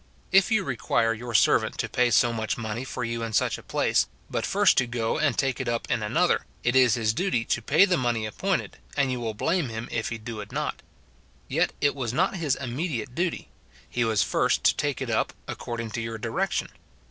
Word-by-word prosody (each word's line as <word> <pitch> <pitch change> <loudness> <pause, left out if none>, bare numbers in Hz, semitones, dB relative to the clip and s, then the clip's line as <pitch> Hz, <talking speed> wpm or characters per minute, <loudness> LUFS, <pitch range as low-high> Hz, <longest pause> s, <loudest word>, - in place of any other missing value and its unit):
If 195 -1 +5
you 220 -3 +3
require 115 -3 +1
your 115 +1 -6
servant - - +3
to - - -1
pay 125 0 +2
so 120 0 +4
much 110 -1 -2
money 115 +1 -4
for 125 -1 -5
you 115 0 -2
in 115 -1 -4
such - - +1
a - - -11
place, - - +1 0.2
but - - -1
first - - +4
to 130 - 0
go 115 +2 -1
and 145 -5 +1
take 135 -1 0
it 130 - -4
up 115 0 -2
in 120 -2 +1
an 105 +7 -2
other, 180 0 +3 0.2
it 120 +1 +1
is 125 -4 +5
his 110 -2 +1
duty 145 - 0
to 115 - 0
pay 155 - +5
the 180 -2 +1
money 120 -3 0
appointed, 190 - -2 0.2
and 140 -2 +2
you 125 - -2
will 115 -2 -3
blame 160 - 0
him 115 +1 -5
if 115 -1 -1
he 115 - -4
do 110 0 -7
it 105 - -10
not; - - -3 0.7
yet - - +1
it 145 - +3
was 125 -5 -3
not 185 +6 +1
his 150 -6 +1
imme 135 +7 -3
diate 120 -4 -4
duty, 170 +4 -2 0.2
— 60 0 -27
he 120 - +1
was 110 -3 +2
first - - +1
to - - +4
take 145 -2 -1
it 120 - -4
up, 110 - 0
according 115 -2 -5
to 115 - -3
your 115 0 -4
direction. 105 - -1
120 Hz, 230 wpm, -26 LUFS, 115-140 Hz, 0.7 s, If